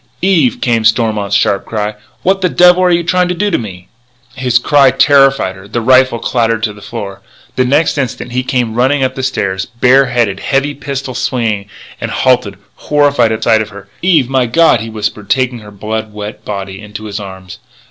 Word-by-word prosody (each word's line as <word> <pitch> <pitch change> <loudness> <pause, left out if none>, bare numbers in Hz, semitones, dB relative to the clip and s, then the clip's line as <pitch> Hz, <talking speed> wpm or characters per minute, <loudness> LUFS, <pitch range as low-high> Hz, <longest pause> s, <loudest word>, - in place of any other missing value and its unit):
"Eve!" 195 +7 +2
came 115 -2 +1
Stormont's 110 -3 +1
sharp 100 -1 +1
cry, 105 -1 -3 0.3
"what 195 +1 +1
the 180 - +2
devil 180 +1 +5
are 180 - +3
you 170 -1 +2
trying 180 +2 +1
to 180 - -2
do 205 +3 -1
to - - +1
me?" 95 -5 -9 0.5
His 125 -1 +1
cry 140 +2 +4
terrified 135 -8 +3
her; 95 +1 -13
the 115 +3 -2
rifle 130 +1 +3
clattered 115 -1 -1
to 110 -2 -1
the 105 - -15
floor. 100 -2 -7 0.3
The 130 - +1
next 145 +3 +1
instant 125 -2 -4
he 125 +1 0
came 125 -3 -1
running 130 +4 +1
up 130 0 0
the 130 - -5
stairs, 95 -7 -2
bare 125 +3 +3
headed, 120 -6 0
heavy 140 +1 0
pistol 135 -2 -5
swinging, 110 -5 -2 0.3
and - - -3
halted, - - +1 0.2
horrified 145 -6 +2
at 110 0 -3
sight 110 -2 +3
of 110 - -5
her. 100 -1 -13
"Eve! 165 -8 +3
My 130 -2 +1
God!" 160 +1 +3
he 115 - -6
whispered, 105 -2 -4
taking 125 -2 0
her 105 -1 -12
blood 110 +2 -5
wet 105 +1 -8
body 100 -1 -6
into 105 0 -9
his 105 -1 -5
arms. 95 -2 -10
120 Hz, 200 wpm, -13 LUFS, 105-135 Hz, 0.5 s, devil